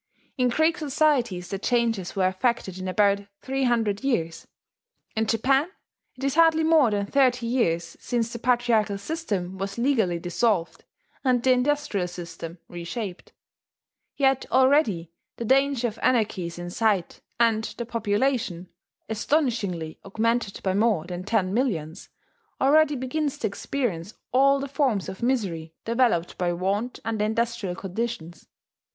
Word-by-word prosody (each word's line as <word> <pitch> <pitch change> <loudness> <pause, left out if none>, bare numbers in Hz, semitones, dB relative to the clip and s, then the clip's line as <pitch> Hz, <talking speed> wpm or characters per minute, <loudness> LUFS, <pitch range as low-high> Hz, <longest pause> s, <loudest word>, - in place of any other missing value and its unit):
In 250 -2 +2
Greek 315 +6 +2
societies 265 - +1
the 195 - -3
changes 230 -5 0
were 190 -2 +3
effected 190 -1 -1
in 185 - -4
about 200 +1 +3 0.2
three 270 0 -1
hundred 225 -3 +1
years; 165 -12 -1 0.7
in 220 0 0
Japan 270 - +2 0.5
it 255 - -10
is 275 -1 +1
hardly 325 0 +5
more 315 -6 +5
than 205 -1 -1
thirty 250 +1 +2
years 170 -9 0
since 235 -2 -2
the 235 - -5
patriarchal 230 -4 +2
system 200 - -4
was 195 +2 -4
legally 235 -9 +2
dissolved 175 +1 -1 0.4
and 250 -3 +2
the 260 - +4
industrial 255 -7 +1
system 170 -1 -8
reshaped; 175 +3 -6 0.8
yet 270 -2 +2
already 260 - +3 0.3
the 235 - -4
danger 270 0 +3
of 215 - -13
anarchy 215 -7 +1
is 170 - -8
in 175 0 -6
sight, 205 -4 0 0.2
and 225 -2 +3
the 235 - -3
population 215 -5 -1 0.4
astonishingly 220 - -1
augmented 220 +1 -1
by 190 - +1
more 205 -5 +2
than 180 0 -5
ten 195 -2 0
millions 190 - -2 0.5
already 295 +2 +4
begins 275 +3 -2
to - - -3
experience 205 -4 -3 0.2
all 275 +2 +4
the 275 - -4
forms 265 - 0
of 190 0 -7
misery 190 -11 -1
developed 230 -7 +1
by 175 -1 +1
want 195 +7 -2
under 220 -2 -1
industrial 220 -3 -1
conditions. 190 -3 -5
225 Hz, 140 wpm, -25 LUFS, 185-260 Hz, 0.8 s, hardly